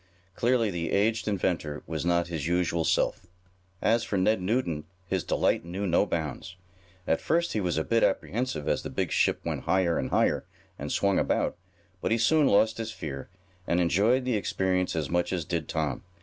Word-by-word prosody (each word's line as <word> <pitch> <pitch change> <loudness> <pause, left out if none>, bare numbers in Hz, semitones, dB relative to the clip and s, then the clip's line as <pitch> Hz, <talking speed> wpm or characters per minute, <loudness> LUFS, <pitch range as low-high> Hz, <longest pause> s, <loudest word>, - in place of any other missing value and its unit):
Clearly 115 -1 +2
the 85 -2 -3
aged 110 +2 +1
inventor 85 -7 -1
was 80 -2 -3
not 85 0 +2
his 80 -4 -4
usual 85 -1 +1
self. 90 - 0 0.6
As 115 +2 +3
for 100 - -2
Ned 95 +2 +2
Newton 90 -7 -1 0.2
his 95 -1 -1
delight - - +1
knew 90 +4 -4
no 95 +2 +2
bounds, 80 +1 -4 0.5
At 80 - +1
first 170 +1 +1
he 110 - 0
was 90 -4 -1
a 80 - +1
bit 115 +5 +1
apprehensive 95 - 0
as - - +1
the - - -6
big - - -2
ship - - +2
went - - -3
higher 95 -3 +2
and - - -2
higher, - - +2 0.4
and - - -4
swung 100 -1 +2
about, - - 0 0.5
but - - 0
he 115 - +4
soon 145 +6 +4
lost 110 +2 +3
his 115 0 -3
fear, 70 -8 -6 0.4
and 85 - +2
enjoyed 105 +9 +3
the 125 - 0
experience 95 -3 0
as 80 -3 -1
much 85 +4 0
as 90 -4 -2
did 85 -2 -3
Tom. 75 -5 -1
90 Hz, 190 wpm, -28 LUFS, 85-110 Hz, 0.6 s, he